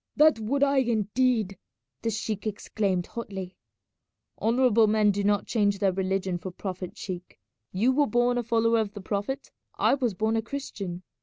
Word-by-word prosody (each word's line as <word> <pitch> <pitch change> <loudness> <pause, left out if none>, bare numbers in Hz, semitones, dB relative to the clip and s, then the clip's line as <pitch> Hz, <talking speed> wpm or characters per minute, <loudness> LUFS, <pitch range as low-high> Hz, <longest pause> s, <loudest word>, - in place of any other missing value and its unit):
"That 305 -4 +5
would 270 +6 0
I 280 0 +3
indeed!" 225 -3 +1 0.4
the 230 - 0
sheik 220 -1 -3
exclaimed 200 -3 -1
hotly. 195 -6 -6 0.9
"Honourable 230 -1 +4
men 210 -1 +4
do 200 0 -2
not 205 0 +2
change 205 -3 +1
their 195 -1 +2
religion 190 -1 -1
for 185 - -6
profit, 185 0 -6
sheik. 180 -2 -7 0.3
You 220 +8 +2
were 290 +2 +3
born 245 0 +2
a - - -1
follower 230 0 +2
of 210 -2 -2
the 205 - -7
Prophet, 205 +7 -3 0.3
I - - +4
was 250 -7 0
born 220 +3 +1
a 225 - +2
Christian. 205 -8 -6
215 Hz, 165 wpm, -27 LUFS, 195-240 Hz, 0.9 s, That